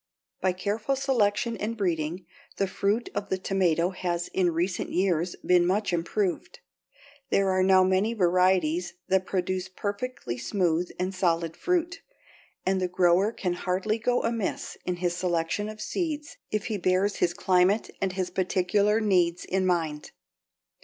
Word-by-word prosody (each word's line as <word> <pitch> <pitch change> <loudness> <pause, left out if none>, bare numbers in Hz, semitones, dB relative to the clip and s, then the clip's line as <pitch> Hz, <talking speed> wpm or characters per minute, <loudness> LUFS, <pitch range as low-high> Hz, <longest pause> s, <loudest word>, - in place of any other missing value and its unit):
By 185 - +2
careful 210 +8 -1
selection 235 -4 +1
and 225 +2 -3
breeding, 175 -2 -1 0.3
the 200 - +2
fruit 200 +4 -1
of 205 - -4
the 190 - 0
tomato 185 -2 +1
has 175 -2 -3
in 185 -2 +1
recent 175 +2 -1
years 180 -2 +1
been 180 -1 +5
much 195 +2 0
improved. 180 - -1 0.7
There 195 -1 +2
are 185 0 +2
now 190 0 +5
many 190 +5 +2
varieties 180 -2 +2
that 190 0 +2
produce 185 0 -2
perfectly 200 - -4
smooth 175 - 0
and 185 +1 -2
solid 170 -3 0
fruit, 360 - -1 0.6
and 190 0 +1
the 185 - +1
grower 180 +3 +3
can 180 -6 -2
hardly 190 +5 -1
go 245 +2 +1
amiss 230 -3 -2
in 180 - -1
his 175 0 -1
selection 175 +3 -1
of 215 0 -9
seeds 310 - -3
if 215 -1 -2
he 215 -4 -2
bears 185 +3 +1
his 175 -1 +1
climate 185 +4 +2
and 190 -1 0
his 185 -1 -2
particular 195 +3 +2
needs 180 -4 +2
in 190 0 0
mind. 160 -4 -1
185 Hz, 150 wpm, -27 LUFS, 175-205 Hz, 0.7 s, been